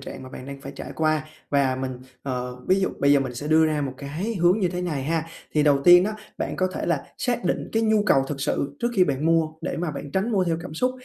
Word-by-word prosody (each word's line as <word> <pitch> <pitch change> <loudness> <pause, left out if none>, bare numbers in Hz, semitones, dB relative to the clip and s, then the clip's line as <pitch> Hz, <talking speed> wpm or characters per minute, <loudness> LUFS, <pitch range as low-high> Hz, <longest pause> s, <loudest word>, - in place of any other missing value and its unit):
trạng 135 - -8
mà 130 - -9
bạn 130 0 -9
đang 140 0 -8
phải 140 0 -8
trải - - -7
qua. 155 -1 +1 0.3
Và 140 -2 +2
mình, 130 -1 -4 0.2
ờ, 125 -2 -3
ví 190 +1 +4
dụ 190 - +2
bây 140 0 +4
giờ 140 - +5
mình 130 -2 -3
sẽ 145 +5 -5
đưa 160 0 +5
ra 155 -1 0
một 135 -3 -3
cái 155 - -4
hướng 175 +1 +3
như 180 - +2
thế 180 0 -3
này 155 -6 -2
ha. 160 +3 -1 0.3
Thì 150 - +3
đầu 145 -2 +4
tiên 175 0 +8
đó, 215 - -1 0.3
bạn - - -3
có 185 0 +1
thể - - -3
là 170 -5 0
xác 245 -6 -1
định 175 - -1
cái 225 - +2
nhu 215 -1 +3
cầu 135 -6 +4
thực 145 -2 -4
sự 140 0 -1
trước 235 - +1
khi 185 - +6
bạn 140 -1 -1
mua, 165 -1 +3
để 175 - -3
mà 170 -1 -2
bạn 145 -1 -7
tránh 195 +5 0
mua 190 -3 +2
theo 165 -2 0
cảm 155 - -8
xúc. 250 +9 +1
155 Hz, 285 wpm, -24 LUFS, 140-180 Hz, 0.3 s, tiên